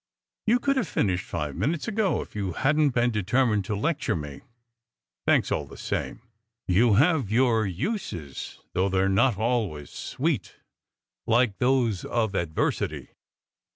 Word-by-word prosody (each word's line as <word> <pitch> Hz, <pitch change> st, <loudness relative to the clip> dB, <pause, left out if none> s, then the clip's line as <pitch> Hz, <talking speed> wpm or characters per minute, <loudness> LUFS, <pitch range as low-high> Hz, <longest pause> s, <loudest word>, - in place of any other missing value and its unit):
"You 235 Hz, +3 st, +5 dB
could 275 Hz, +2 st, 0 dB
have 240 Hz, -9 st, 0 dB
finished 95 Hz, -9 st, 0 dB
five 75 Hz, -4 st, -4 dB
minutes 145 Hz, -, -1 dB
ago, 215 Hz, -4 st, 0 dB
if -, -, -19 dB
you 100 Hz, -4 st, -2 dB
hadn 150 Hz, -, +2 dB
t -, -, +4 dB
been 120 Hz, 0 st, +3 dB
determined 105 Hz, 0 st, +1 dB
to 105 Hz, -, -2 dB
lecture 140 Hz, -, 0 dB
me. 75 Hz, -3 st, -6 dB, 0.9 s
Thanks, -, -, +3 dB
all -, -, -1 dB
the -, -, -12 dB
same. -, -, -4 dB, 0.4 s
You 105 Hz, +4 st, +4 dB
have 145 Hz, -, +3 dB
your 115 Hz, -2 st, +3 dB
uses, 95 Hz, -, -4 dB, 0.2 s
though 95 Hz, +2 st, +1 dB
they 95 Hz, 0 st, +1 dB
re 95 Hz, -, +2 dB
not 105 Hz, +3 st, +3 dB
always 110 Hz, -10 st, -1 dB
sweet, 135 Hz, -, -2 dB, 0.7 s
like 115 Hz, -3 st, +2 dB
those 125 Hz, -6 st, +2 dB
of 110 Hz, -4 st, -1 dB
adversity." 85 Hz, -4 st, -1 dB
115 Hz, 150 wpm, -26 LUFS, 95-135 Hz, 0.9 s, You